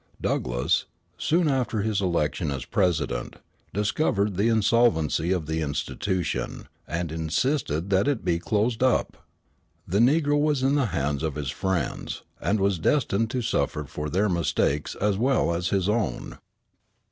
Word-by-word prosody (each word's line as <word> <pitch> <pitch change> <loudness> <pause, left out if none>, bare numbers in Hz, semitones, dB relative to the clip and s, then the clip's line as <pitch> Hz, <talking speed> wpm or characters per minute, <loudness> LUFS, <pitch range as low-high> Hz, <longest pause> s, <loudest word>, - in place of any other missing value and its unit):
Douglass, 60 0 0 0.3
soon 170 +1 +1
after 125 -6 0
his 105 -2 0
election 85 -3 0
as 65 -2 -4
president, 80 -10 0 0.4
discovered 105 -1 0
the 100 +5 +2
insolvency 110 -8 +2
of 90 -4 0
the 80 +1 -2
institution, 80 +3 -2 0.2
and 85 0 -3
insisted 80 - -1
that 95 +6 +3
it 140 -5 0
be 85 -1 +1
closed 110 +6 0
up. 130 -1 +2 0.7
The 100 +4 +1
negro 145 +4 +3
was 150 -3 +1
in 135 +1 +3
the 140 -4 +2
hands 70 -6 -1
of 80 -3 -2
his 70 -3 -3
friends, 95 -5 -2 0.2
and 105 +1 +1
was 100 -2 +1
destined 115 - +1
to 125 0 -2
suffer 75 -7 0
for 75 +2 -5
their 95 +7 +2
mistakes 80 -5 0
as 105 -1 0
well 130 -8 +2
as 90 +1 -1
his 95 -2 +1
own. 105 -3 -2
95 Hz, 145 wpm, -26 LUFS, 80-115 Hz, 0.7 s, that